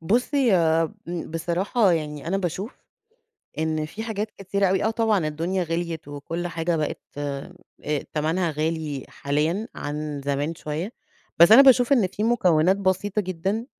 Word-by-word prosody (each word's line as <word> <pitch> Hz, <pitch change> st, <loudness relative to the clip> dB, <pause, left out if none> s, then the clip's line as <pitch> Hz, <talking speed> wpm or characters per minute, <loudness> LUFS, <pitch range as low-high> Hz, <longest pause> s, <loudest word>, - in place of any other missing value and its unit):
بُصّي 245 Hz, -, +2 dB, 0.6 s
ب 175 Hz, -2 st, -5 dB
بصراحة 180 Hz, +6 st, +1 dB
يعني 150 Hz, -3 st, -3 dB
أنا 190 Hz, -, +1 dB
باشوف 195 Hz, +4 st, -4 dB, 0.8 s
إن 155 Hz, -1 st, 0 dB
في 210 Hz, +8 st, -7 dB
حاجات 215 Hz, -1 st, -3 dB
كتيرة 200 Hz, +1 st, 0 dB
أوي 190 Hz, 0 st, +2 dB
آه، 220 Hz, -, +2 dB
طبعًا 220 Hz, -7 st, +1 dB
الدنيا 170 Hz, +5 st, -1 dB
غليت 165 Hz, -2 st, -3 dB
وكل 155 Hz, +5 st, -5 dB
حاجة 170 Hz, 0 st, -1 dB
بقت 155 Hz, -2 st, -2 dB, 0.2 s
آآ، 140 Hz, -1 st, -4 dB, 0.6 s
تمنها 160 Hz, +3 st, 0 dB
غالي 155 Hz, -2 st, -2 dB
حاليًا 155 Hz, +9 st, -1 dB
عن 150 Hz, 0 st, -4 dB
زمان 145 Hz, +3 st, -1 dB
شوية، 155 Hz, +7 st, -4 dB, 0.5 s
بس 170 Hz, +4 st, +8 dB
أنا 235 Hz, +5 st, +11 dB
باشوف 265 Hz, 0 st, +6 dB
إن 225 Hz, -8 st, +3 dB
في 205 Hz, +3 st, -4 dB
مكونات 185 Hz, -6 st, +3 dB
بسيطة 200 Hz, +2 st, 0 dB
جدًا 190 Hz, +4 st, -2 dB
175 Hz, 145 wpm, -24 LUFS, 155-200 Hz, 0.8 s, أنا